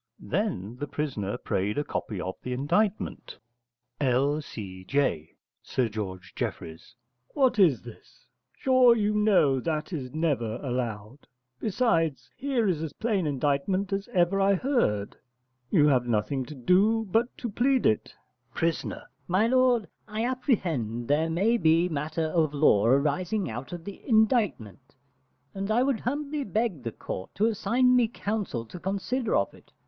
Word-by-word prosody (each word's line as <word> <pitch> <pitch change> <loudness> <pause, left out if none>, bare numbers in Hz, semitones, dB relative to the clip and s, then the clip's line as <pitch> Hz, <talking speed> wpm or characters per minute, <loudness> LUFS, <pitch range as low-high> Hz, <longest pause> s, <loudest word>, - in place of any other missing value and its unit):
Then 145 - -2
the 145 - -4
prisoner 130 -10 -3
prayed 100 +5 -2
a 145 - +1
copy 105 -8 -4
of 95 +1 -3
the 125 - -4
indictment. 180 +11 -1 0.6
L.C.J. 125 - -1 0.3
(Sir 125 -3 -1
George 95 -4 -6
Jeffreys). 80 +9 -6 0.4
What 260 -5 +3
is 145 - +4
this? - - -14 0.3
Sure 255 -2 +5
you 210 -1 +1
know 195 -11 +3
that 155 +5 -3
is 130 -6 -4
never 140 -8 -1
allowed. 120 -1 -4 0.3
Besides, 170 - 0
here 255 -4 0
is 170 -5 0
a 160 -3 -5
plain 205 -7 0
indictment 145 +8 0
as 195 0 -2
ever 195 -3 +2
I 195 0 +4
heard; 180 - 0 0.5
you 155 -6 +4
have 125 -3 +2
nothing 120 +4 0
to 150 - -9
do 205 - +3
but 235 +4 +1
to 240 - -4
plead 255 +4 +2
to - - +6
it. 110 - -6 0.4
Pris. 165 0 0 0.4
My 185 +5 +3
lord, 250 -3 +3 0.2
I 220 +1 -2
apprehend 170 - -1
there 155 +3 +2
may 200 +9 +2
be 165 -1 +3
matter 155 0 -2
of 155 -2 +1
law 115 -8 +4
arising 150 - +1
out 120 +8 -7
of 175 -2 -6
the 200 - -8
indictment, 215 - +1 0.6
and 195 +1 -4
I 235 +3 +3
would 265 -4 +1
humbly 290 +3 -2
beg 210 - -1
the 115 - -4
court 95 - -7
to 210 - +2
assign 245 +3 +2
me 245 -2 +4
counsel 205 - -3
to 180 - -10
consider 200 - -1
of 100 - +1
it. - - -19
165 Hz, 150 wpm, -27 LUFS, -, 0.6 s, to